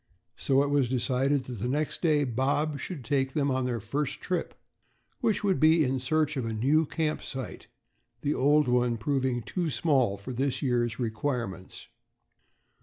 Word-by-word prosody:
So 135 +1 +2
it 145 - -1
was 140 -4 +2
decided 130 +2 +1
that 125 -4 -7
the 120 - -2
next 150 +4 -1
day 155 -4 +3
Bob 140 +4 0
should 150 -10 -6
take 135 +1 0
them 140 -3 +1
on 130 0 0
their 120 -2 -1
first 135 +6 -3
trip, 180 -2 -3 0.6
which 225 -5 0
would 195 -3 +2
be 160 +1 +5
in 130 -1 0
search 155 +4 0
of 130 - -1
a 115 0 -3
new 145 +8 +2
camp 155 -1 -1
site, 130 -1 -7 0.5
the 145 - 0
old 145 +2 +3
one 125 -1 +2
proving 130 -1 -1
too 175 - -2
small 130 -5 +1
for 115 +6 -7
this 135 +3 -1
year's 120 -4 0
requirements. 115 -4 -4
135 Hz, 170 wpm, -28 LUFS, 125-150 Hz, 0.6 s, be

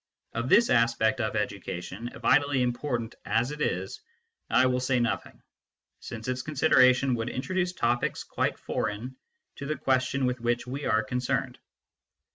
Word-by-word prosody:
Of 120 +2 -2
this 235 +2 +5
aspect 115 0 +3
of 110 0 -2
education, 100 +1 -4
vitally 140 -2 +3
important 120 -2 -2
as 120 +4 0
it 150 0 -7
is, 95 -5 -2 0.5
I 130 - +4
will 125 0 +2
say 125 0 +1
nothing, 120 -1 -2 0.6
since 110 +1 -8
its 130 0 -1
consideration 130 -3 +4
would 115 0 -2
introduce 180 +8 -2
topics 120 -6 0
quite - - -1
foreign 115 +6 -3 0.4
to 140 - -6
the 155 - -2
question 130 +1 +1
with 125 -1 -1
which 120 0 0
we 135 +3 -5
are 110 0 +2
concerned. 125 +3 -2
125 Hz, 145 wpm, -28 LUFS, 115-135 Hz, 0.6 s, this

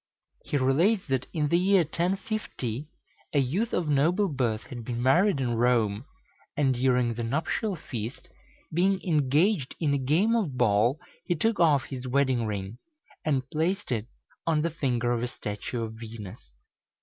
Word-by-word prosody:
He 145 - -1
relates 165 +11 +2
that 130 -1 0
in 150 -3 0
the 170 - +3
year 190 0 +4
1050, 170 - -3 0.5
a 145 - +4
youth 175 - 0
of 175 - 0
noble 165 +8 +2
birth 120 -7 -1
had 120 -2 -8
been 120 +1 -4
married 170 +7 +3
in 125 -3 0
Rome, 115 -2 +2 0.5
and 135 -3 +3
during 125 -1 +2
the 120 - -5
nuptial 155 - -1
feast, 120 -6 -6 0.5
being 190 +3 +2
engaged 155 +1 +2
in 150 -4 +1
a 140 - +1
game 165 - +2
of 170 - -1
ball, 120 +4 +3 0.3
he 175 - +1
took 225 +7 +1
off 150 -5 +4
his 130 -2 -6
wedding 130 -3 +1
ring, 100 +2 -4 0.4
and 135 -4 0
placed 170 +3 -1
it 115 -2 -1 0.4
on 155 -2 +2
the 170 - 0
finger 125 -6 0
of 120 -1 0
a 125 - -1
statue 110 +1 -5
of 110 -1 -5
Venus. 110 - -9
135 Hz, 160 wpm, -27 LUFS, 120-170 Hz, 0.5 s, year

